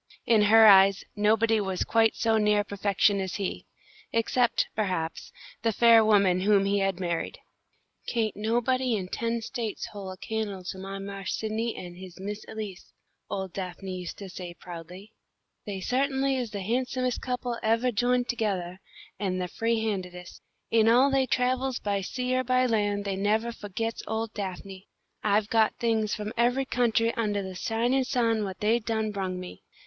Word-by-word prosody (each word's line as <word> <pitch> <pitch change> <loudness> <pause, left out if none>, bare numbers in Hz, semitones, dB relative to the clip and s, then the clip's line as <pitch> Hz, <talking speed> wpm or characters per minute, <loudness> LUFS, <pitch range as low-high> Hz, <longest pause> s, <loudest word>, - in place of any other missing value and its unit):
In 225 -2 +4
her 220 +2 +7
eyes, 195 -1 +7
nobody 220 +1 +3
was 190 -2 -1
quite 225 -1 +3
so 225 -1 +2
near 210 -1 +3
perfection 200 0 +1
as 190 -1 -4
he, 195 -2 -4 0.4
except, 235 +1 +2
perhaps, 180 -6 -2 0.3
the 225 - +2
fair 230 +1 +6
woman 200 -4 +4
whom 200 +1 +3
he 200 +1 +1
had 195 -2 0
married. 170 -2 -2 0.7
"Kain't 225 -3 -1
nobody 240 +3 +1
in 185 -3 -4
ten 230 +1 -2
States 230 -4 -4
hole 200 -2 -7
a 185 - -8
can'le 210 -2 -4
to 190 - -9
my 195 +1 -6
Marse 195 0 -4
Sidney 220 +1 -2
an' 175 -1 -8
his 180 0 -11
Miss 205 +2 -5
Elise," 210 -4 -7 0.4
old 190 -2 -4
Daphne 185 0 -5
used 180 -1 -6
to 200 - -8
say, 180 -1 -8
proudly. 180 +4 -10 0.6
"They 200 -2 -4
sut'n'ly 270 +3 +1
is 250 -3 -2
the 205 -2 -5
handsomest 255 +4 -1
couple 250 -2 -3
evah 230 +3 +2
jined 245 +3 +1
togethah, 190 -6 -2 0.4
an' 190 -2 -1
the 180 -1 -2
free 225 +4 -1
handedest. 180 -4 -5 0.3
In 225 -1 +5
all 255 +4 +5
they 270 -1 +2
travels 255 +1 0
by 200 -1 -1
sea 250 +6 -2
or 255 - +1
by 255 +1 +2
land 205 -3 0
they 195 -1 -1
nevah 215 +4 +1
fo'gits 225 +1 -4
ole 220 +1 -2
Daphne. 195 -1 -6 0.4
I've 210 0 +1
got 220 -1 +3
things 225 -3 0
from 210 +1 -5
every 245 +3 +2
country 230 -2 +1
undah 210 -3 -1
the 190 0 -6
shinin' 240 +6 0
sun 230 -4 +1
what 190 -2 -6
they 220 +3 +3
done 220 -1 -2
brung 190 -2 -3
me." 180 0 -9
215 Hz, 170 wpm, -27 LUFS, 195-230 Hz, 0.7 s, her